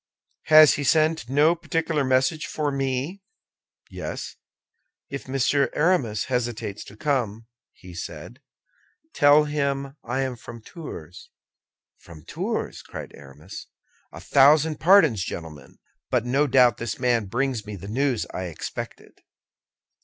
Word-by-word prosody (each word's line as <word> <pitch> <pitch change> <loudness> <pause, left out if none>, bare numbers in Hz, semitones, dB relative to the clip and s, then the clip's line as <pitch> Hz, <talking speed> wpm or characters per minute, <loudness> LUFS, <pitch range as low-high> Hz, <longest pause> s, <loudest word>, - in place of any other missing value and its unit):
"Has 155 -1 +8
he 145 - -3
sent 155 -2 +2
no 150 +5 +4
particular 165 -3 -1
message 130 +4 +1
for 150 -2 -2
me?" 135 +7 -2 0.7
"Yes. - - -6 0.8
If 140 -1 -6
Monsieur 135 +1 +1
Aramis 150 - +1
hesitates 120 -5 -3
to 100 - -14
come," 115 -6 -1 0.3
he 90 -1 -14
said, 85 - -8 0.7
"tell 145 +1 +6
him 140 -2 -2
I 125 +3 -2
am 130 -2 -3
from 115 0 -11
Tours." 90 - -10 0.7
"From 80 -3 -14
Tours!" - - -4
cried - - -9
Aramis. 70 +6 -11 0.4
"A - - -10
thousand 150 +3 +4
pardons, 160 - +5
gentlemen; 80 -4 -8 0.3
but 120 -2 0
no 140 +4 +2
doubt 125 -4 +4
this 115 -1 -4
man 120 -4 +1
brings 120 0 -2
me 105 - -6
the 95 +1 -9
news 125 +1 0
I 95 - -4
expected." 85 -3 -8
130 Hz, 125 wpm, -24 LUFS, 110-145 Hz, 0.8 s, Has